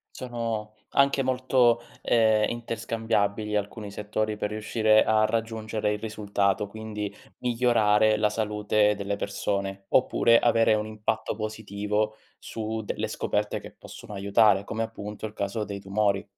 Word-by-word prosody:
Sono 115 -3 -4
anche 140 -1 +3
molto, 125 -2 +3 0.2
ehm, 110 -2 +4
interscambiabili 110 -3 -1
alcuni 105 +1 -3
settori 105 +1 -2
per 105 0 -2
riuscire 110 0 +3
a 110 0 +3
raggiungere 110 -2 -1
il - - -2
risultato, 105 -2 -1
quindi 105 -1 -5 0.3
migliorare 110 -3 +3
la 105 0 +2
salute 105 -1 +1
delle 100 0 -3
persone, 100 -1 -3
oppure 115 -2 +4
avere 115 -1 +4
un 105 0 -1
impatto 110 0 -2
positivo 105 0 -2 0.2
su 110 0 -5
delle - - -3
scoperte - - -1
che - - -11
possono 105 - -11
aiutare, 100 0 +3
come 115 +1 -2
appunto 105 -1 -6
il 105 - -6
caso 100 +1 -2
dei 100 0 -5
tumori. 100 0 0
110 Hz, 130 wpm, -26 LUFS, 105-110 Hz, 0.3 s, ehm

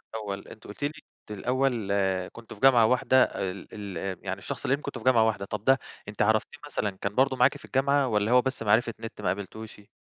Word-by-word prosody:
الأول 100 -3 -5
أنتِ 110 - -13
قلتِ 105 - -9
لي 145 - +3
إن - - -12 0.4
أنتِ 105 -2 -6
الأوّل 125 -6 0 0.4
كنتم 115 -1 -11
في - - -19
جامعة 125 -4 +6
واحدة 130 +2 +4
ال 95 -1 -4
ال 95 -2 -5
يعني 95 0 -3
الشخص - - -6
اللي 135 - +2
يهمك 145 - -12
كنتم 135 -3 -5
في - - -13
جامعة 120 -4 +5
واحدة، 100 -3 -1
طب 105 0 -5
ده 135 0 +6 0.3
أنتِ 105 - -4
عرفتيه 110 +6 +1
مثلًا 105 -7 -1
كان 100 +2 -5
برضو 130 +1 +3
معاكِ - - +3
في - - -14
الجامعة 140 +1 +2
والَّا 105 -1 +1
هو 125 - +6
بس 130 -2 -3
معرفة 115 +2 +3
نت 115 -2 -8
ما - - -2
قابلتيهوش؟ 105 +1 -5
110 Hz, 225 wpm, -27 LUFS, 100-130 Hz, 0.4 s, جامعة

